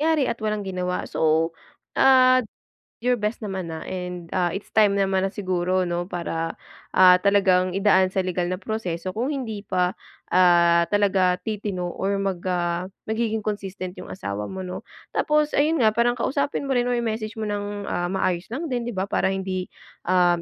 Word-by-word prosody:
nangyari 310 -2 +3
at 235 - -1
walang 210 -1 -1
ginawa. 180 -1 -2
So, 160 +1 +1 0.4
ah 255 -1 +6 0.6
you're 250 +1 +2
best 215 +1 -2
naman 190 -4 -4
na 160 0 -6
and, 180 -1 -5
ah, 180 -2 +2
it's 195 - -7
time 205 -2 +4
naman 190 -1 +2
na 195 - 0
siguro, 185 -2 0
'no, 175 +1 -3
para, 165 -1 -3 0.4
ah, 180 -1 +8
talagang 190 -2 +3
idaan 190 -2 +4
sa 190 -1 -1
legal 180 -1 -1
na 185 - -2
proseso 185 -4 -4
kung 245 +6 -1
hindi 230 -8 -4
pa, 180 -2 0 0.4
ah, 170 -2 +5
talaga 190 -3 +2
titino 200 -5 -3
or 200 +1 -1
mag, 195 -3 -2
ah, 175 +1 -1 0.2
magiging 220 -1 -1
consistent 195 -3 -4
yung - - -10
asawa 105 - -5
mo, 190 -1 -6
'no? 180 - -6 0.3
Tapos 300 0 +1
ayun 310 +3 +3
nga 215 -1 +4
parang 240 +1 +2
kausapin 280 +3 -1
mo 270 - 0
rin 245 0 +1
o - - +1
i-message 220 -2 -3
mo 215 - -2
ng, 205 -1 -3
ah, 175 0 -2
maayos 185 0 -1
lang 320 +6 -3
din, 245 -1 0
'di - - -5
ba, 190 - 0
para 190 - 0
hindi, 190 -1 -3 0.4
um, 175 -1 +3
190 Hz, 180 wpm, -24 LUFS, 180-220 Hz, 0.6 s, ah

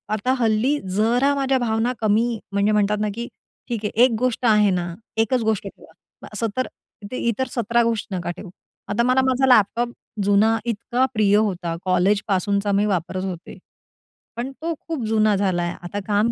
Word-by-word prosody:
आता 240 +5 0
हल्ली 235 +5 +2 0.2
जरा 240 +7 +3
माझ्या 270 -1 +1
भावना 230 +1 0
कमी 225 +2 +1
म्हणजे 200 +1 +2
म्हणतात 210 0 +2
ना, 215 - +1
की 235 +1 -4 0.4
ठीक 225 -3 -3
आहे 220 +3 +3
एक 255 - +5
गोष्ट 255 0 -1
आहे 210 -2 +5
ना, 175 -2 -2 0.3
एकच 245 +3 0
गोष्ट 215 -2 -1
ठेवा. 160 - -14 0.4
असं 225 +2 -1
तर, 255 - 0 0.4
ते 255 - -4
इतर 250 +3 0
सतरा 235 0 +2
गोष्ट 230 -2 -1
नका 175 -2 -3
ठेवू. 190 - -9 0.4
आता 210 +3 0
मला 255 +2 +3
माझा 260 0 +2
लॅपटॉप 240 0 +4 0.3
जुना 205 +3 +3
इतका 235 +3 0
प्रिय 210 -3 +3
होता 180 -6 -1
कॉलेजपासूनचा 200 +2 +1
मी 205 - +2
वापरत 185 -1 -2
होते, 185 -2 -6 0.8
पण 240 +3 -4
तो 335 +1 -1
खूप 320 -7 -3
जुना 215 -1 +3
झालाय 180 -3 0
आता 175 +4 -5
काम 210 +2 +2
215 Hz, 170 wpm, -22 LUFS, 200-240 Hz, 0.8 s, एक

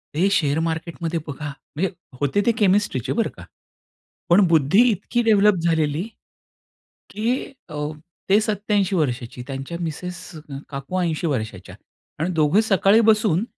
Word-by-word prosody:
हे 180 +6 +3
शेअर 155 -5 +2
मार्केटमध्ये 165 0 -3
बघा 145 +1 -5 0.3
म्हणजे 185 +5 0 0.3
होते 145 +8 +2
ते 235 - +5
केमिस्ट्रीचे 190 - +1
बरं 230 - +1
का. - - -10 0.9
पण 185 +3 +6
बुद्धी 160 - +4
इतकी 225 +3 -1
डेव्हलप 210 -2 +5
झालेली, 160 +1 +1 1.0
की 235 +6 -2 0.2
अ, 155 - -8 0.5
ते 200 +2 +5
87 205 -2 0
वर्षाची 125 -5 -2
त्यांच्या 135 +4 -5
मिसेस 175 +2 -5
अ, 150 -3 -8
काकू 140 +6 -4
80 170 -1 -1
वर्षाच्या 110 - -4 0.4
आणि 165 +4 -1
दोघे 160 +6 +3
सकाळी 205 0 +4
बसून 215 -4 +2
170 Hz, 135 wpm, -22 LUFS, 150-205 Hz, 1.0 s, पण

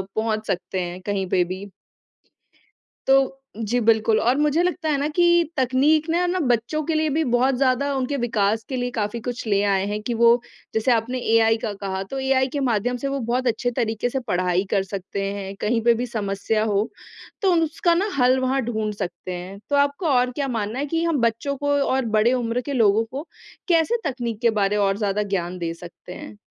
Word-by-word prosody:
पहुँच 220 -1 -1
सकते 185 0 -2
हैं 175 +1 -5
कहीं 195 -1 -2
पे 180 - +3
भी। 185 +3 -6 1.4
तो 270 0 +3 0.2
जी, 230 +2 -1
बिल्कुल 220 -1 +3
और 245 +3 +2
मुझे 300 +3 +2
लगता 355 -2 -1
है 295 - +2
ना 285 - 0
कि 350 - +5 0.3
तकनीक 280 +5 +2
ने 340 - +2
है 360 - +2
ना, 370 - 0
बच्चों 245 +3 0
के 325 - 0
लिए 310 0 +1
भी 315 +3 +1
बहुत 255 +2 +3
ज़्यादा 275 +2 +1
उनके 265 +2 -1
विकास 225 -3 0
के 260 - -3
लिए 245 0 -2
काफ़ी 220 0 -3
कुछ 245 0 -5
ले 200 -1 +2
आए 195 -1 +2
हैं 210 +1 -3
कि 235 +2 -2
वो 235 +1 +5 0.3
जैसे 220 +3 +2
आपने 235 +3 0 0.2
एआई 225 0 +4
का 215 - -1
कहा 190 -1 -3
तो 270 - -3
एआई 265 0 +2
के 285 - -1
माध्यम 245 -1 0
से 275 +3 -3
वो 275 0 -2
बहुत 245 +2 -1
अच्छे 240 +1 0
तरीक़े 225 0 -1
से 265 - -2
पढ़ाई 180 -3 0
कर 195 -2 +2
सकते 195 +1 -5
हैं। 195 -1 -6
कहीं 225 +2 +1
पे 235 -1 +5
भी 245 +2 -2
समस्या 215 -1 -1
हो, 210 0 0 0.5
तो 385 - +4
उन 330 -1 +3
सका 335 +2 +1
ना 385 +5 +1
हल 255 +1 +4
वहाँ 260 +1 +1
ढूँढ़ 220 -2 -2
सकते 180 -2 -5
हैं, 180 +3 -7
तो 285 - +3
आपको 285 +4 +1
और 250 -2 +3
क्या 275 +1 -2
मानना 225 0 -2
है 290 - -1
कि 330 +3 -1
हम 320 -6 +1
बच्चों 235 +5 0
को 285 +1 -2
और 265 -2 +1
बड़े 230 +4 +4
उम्र 245 -1 0
के 285 +3 -5
लोगों 225 -3 +3
को 275 +8 -7 0.4
कैसे 335 +7 +3
तकनीक 240 -4 -4
के 235 - +5
बारे 200 +1 +2
और 195 -1 +2
ज़्यादा 205 -1 0
ज्ञान 185 -3 -3
दे 165 -1 -3
सकते 175 +1 -12
हैं? 210 - -9
235 Hz, 215 wpm, -23 LUFS, 205-270 Hz, 1.4 s, कि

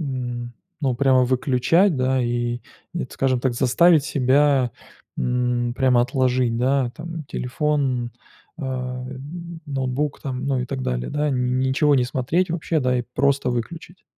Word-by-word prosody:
н 120 -4 -4 0.3
ну, 130 -3 +1
прямо 130 -1 +4
выключать, 135 +7 +2
да, 130 0 +1
и 120 0 -1 0.3
т 170 -6 -3
скажем 130 -2 0
так, 125 -2 0
заставить 150 +5 +4
себя, 135 -2 +2 0.4
м, 125 -1 0
прямо 130 -2 +3
отложить, 125 -2 +1
да, 130 -1 +1
там, 165 0 -6
телефон, 130 -3 -1 0.5
а, 125 -2 -4 0.6
ноутбук, 135 +1 -2
там, 130 -2 -4
ну, 135 -2 +1
и 125 - -3
так 135 0 -4
далее, 60 - -2
да, 150 0 0
нь 125 0 0
ничего 140 +3 +3
не 125 -2 +3
смотреть 135 +9 0
вообще, 165 -1 -1
да, 125 -1 +1
и - - -1
просто 140 -1 +2
выключить? 160 +9 -5
130 Hz, 145 wpm, -22 LUFS, 125-145 Hz, 0.6 s, прямо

